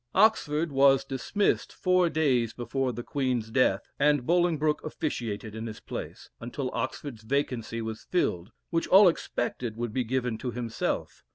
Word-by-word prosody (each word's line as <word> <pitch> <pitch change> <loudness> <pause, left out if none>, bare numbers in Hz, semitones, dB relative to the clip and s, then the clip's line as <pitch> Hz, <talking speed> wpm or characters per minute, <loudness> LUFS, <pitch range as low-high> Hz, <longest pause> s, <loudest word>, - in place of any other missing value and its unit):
Oxford 170 -7 +3
was 135 0 +5
dismissed 135 +10 0
four 185 -1 +2
days 130 -8 +1
before 125 +2 -2
the 120 +1 -6
Queen's 125 -6 -1
death, 110 -6 +2
and 145 -3 +3
Bolingbroke 165 -3 +2
officiated 115 -9 -4
in 110 +1 -5
his 110 - -7
place, - - -7
until 125 +3 -4
Oxford's 130 -1 -4
vacancy 115 -2 -2
was 110 0 -6
filled, 100 - -1 0.2
which 165 -1 0
all 195 +1 +8
expected 120 -8 -2
would 120 -2 -3
be 130 - +1
given 125 -1 -1
to 125 - -3
himself. 120 -1 -3
130 Hz, 150 wpm, -28 LUFS, 115-150 Hz, 0.2 s, all